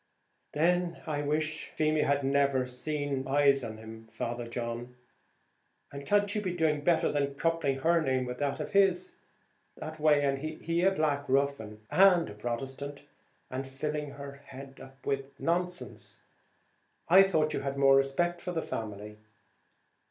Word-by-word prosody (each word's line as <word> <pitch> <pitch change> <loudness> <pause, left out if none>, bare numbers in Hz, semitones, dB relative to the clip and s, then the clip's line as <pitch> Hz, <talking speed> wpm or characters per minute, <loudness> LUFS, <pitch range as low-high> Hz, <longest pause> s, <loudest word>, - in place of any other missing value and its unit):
"Then 175 +2 +1
I 150 -2 -2
wish 155 +1 -1
Feemy 155 0 +2
had 140 -1 +1
never 140 -1 +2
set 140 +1 -3
eyes 140 -1 +4
on 110 -2 -6
him, 110 0 -11
Father 115 +1 -4
John; 120 +1 -5 1.0
and 140 0 -8
can't 205 0 +2
you 210 - -1
be 185 -3 -3
doing 155 -3 +1
better 170 0 +3
than 140 -1 -1
coupling 165 -3 0
her 170 +3 +3
name 130 -3 0
with 125 0 -6
that 140 -1 -1
of - - -4
his, 200 - +3 0.6
that 155 0 -7
way? 150 -1 +4
and 135 -1 +1
he 160 +3 -2
a 190 - +5
black 150 -6 0
ruffian 130 -6 0
and 180 - +5
a - - -8
Protestant, 135 +6 -5 0.4
and 130 +1 -4
filling 150 +2 -3
her 140 0 -9
head 135 0 -11
up 135 0 -16
with 135 -1 -3
nonsense: 180 +1 -2 0.9
I 185 +3 +8
thought 160 -6 +2
you - - -1
had 140 0 -3
more 135 0 +6
respect 155 +6 +1
for 180 - -4
the 160 - -1
family. 105 -1 -6
140 Hz, 155 wpm, -30 LUFS, 135-160 Hz, 1.0 s, I